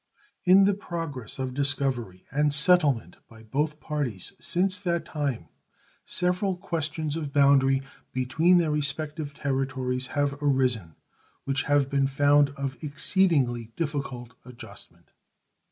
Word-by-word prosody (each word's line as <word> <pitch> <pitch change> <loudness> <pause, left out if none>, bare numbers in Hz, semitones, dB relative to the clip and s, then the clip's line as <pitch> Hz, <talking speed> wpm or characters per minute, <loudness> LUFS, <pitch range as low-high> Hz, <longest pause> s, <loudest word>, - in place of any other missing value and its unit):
In 185 +2 +7
the 200 +1 +4
progress 165 - -5
of 130 -1 -3
discovery 135 -8 -1
and 150 +2 +2
settlement 150 -4 +2
by 110 -1 -15
both 150 +7 -2
parties 145 - -4
since 185 +1 +1
that 170 -3 -1
time 140 - -3 0.6
several 180 +1 0
questions 160 -3 -2
of 155 -4 -4
boundary 135 -1 +4 0.3
between 155 +8 +3
their 165 -3 +2
respective 150 0 -2
territories 130 -2 -2
have 145 0 0
arisen, 125 - +1 0.5
which 135 +1 -1
have 145 -2 +3
been 140 -1 +1
found 145 +1 +4
of 135 +1 -5
exceedingly 140 - +1
difficult 140 -6 -4
adjustment. 120 -5 -13
140 Hz, 120 wpm, -26 LUFS, 130-155 Hz, 0.6 s, In